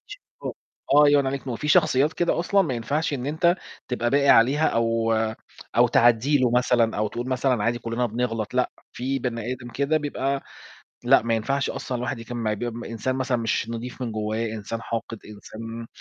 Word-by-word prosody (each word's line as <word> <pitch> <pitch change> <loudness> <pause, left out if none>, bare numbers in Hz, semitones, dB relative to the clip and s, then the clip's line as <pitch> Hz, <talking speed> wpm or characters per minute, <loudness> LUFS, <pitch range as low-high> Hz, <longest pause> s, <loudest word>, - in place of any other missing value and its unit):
آه - - -9 0.4
الله 145 0 +7
ينوّر 145 -1 +4
عليك 135 +1 -2
نور، - - -22
ما 130 - -2
هو 115 - -3
في 150 - -4
شخصيات 145 +1 +4
كده 175 -1 0
أصلًا 195 +3 +3
ما 135 -7 -2
ينفعش 140 +7 -1
إن 130 -2 -3
أنت 170 +4 +2 0.3
تبقى 120 -1 -1
باقي 140 0 +3
عليها 140 +7 +5
أو 115 0 +1 0.6
أو 120 +1 +6
تعدّي 120 +5 +4
له 125 -2 +2
مثلًا 120 -2 +2
أو 105 0 0
تقول 120 +4 -5
مثلًا 130 -3 +1
عادي 120 0 +1
كلنا 115 +1 -1
بنغلط 115 -1 -3
لأ، 125 0 +1 0.2
في 135 +2 -2
بني 120 -1 -3
آدم 125 -1 -8
كده 140 +6 0
بيبقى 140 -2 -2 0.6
لأ - - +5
ما 115 0 0
ينفعش 135 +5 -1
أصلًا 135 -2 -4
الواحد 125 +1 -3
يكمّل 120 +1 -6
معاه، 110 -1 0
بيبقى 120 +2 -5
إنسان 125 +3 -2
مثلًا 130 -1 0
مش 115 -1 -1
نضيف 120 +2 -6
من 115 -3 -3
جوّاه، 110 +1 -2
إنسان 110 +2 -5
حاقد 115 0 -4
إنسان 115 +2 -8
125 Hz, 195 wpm, -24 LUFS, 115-135 Hz, 0.6 s, الله